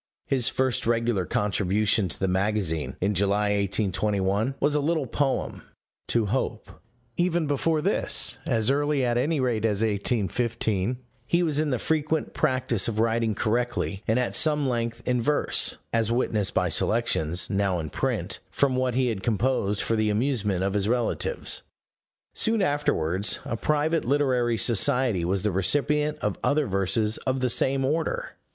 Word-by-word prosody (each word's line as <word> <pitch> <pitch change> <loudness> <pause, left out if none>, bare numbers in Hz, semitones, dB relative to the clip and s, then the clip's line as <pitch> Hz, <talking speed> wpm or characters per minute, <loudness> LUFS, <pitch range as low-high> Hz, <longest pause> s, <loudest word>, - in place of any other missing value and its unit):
His 130 -4 +2
first 130 -3 0
regular 115 -5 +1
contribution 105 0 +1
to - - -6
the 95 - 0
magazine, 95 -4 -1
in 100 +3 +1
July, 100 +2 +1
1821, 100 +3 0
was 145 - +2
a 150 - +2
little 155 0 0
poem 135 +2 -1 0.5
To 115 -2 +1
Hope: 115 +1 -2 0.5
even 175 -2 +1
before 150 +2 0
this, 195 - 0
as 115 -1 +2
early 145 -1 +1
at 120 -1 0
any 150 +4 0
rate 120 -4 0
as 105 -1 +1
1815, 110 +1 -1 0.3
he 175 +1 +2
was 155 -3 0
in 155 -1 0
the 130 - 0
frequent 155 +4 -1
practice 125 -5 0
of 115 -2 -3
writing 115 -1 +1
correctly 110 -3 -1
and 110 - +2
at 125 -1 0
some 150 -3 +3
length 115 -2 -2
in 125 -1 +1
verse, 150 +5 +1 0.2
as 115 -1 +1
witnessed 110 -4 0
by - - +2
selections, 80 +4 0
now 100 -2 +1
in 80 -3 -5
print, - - -2
from 135 -2 +1
what 130 -1 0
he 130 -1 +2
had 105 -4 -3
composed 105 -2 0
for 115 - 0
the 110 -1 +1
amusement 105 -5 0
of 95 0 0
his 100 0 0
relatives. 120 -1 -1 0.7
Soon 220 -2 +2
afterwards, 100 - 0
a - - -3
private 155 +6 0
literary 125 -3 +1
society 120 -3 +2
was 95 +2 -1
the 105 - +1
recipient 145 - +1
of - - -1
other 150 0 +2
verses 100 +2 0
of 130 0 +1
the 125 -2 +1
same 135 +2 +2
order. 165 - -1
115 Hz, 160 wpm, -25 LUFS, 100-135 Hz, 0.7 s, some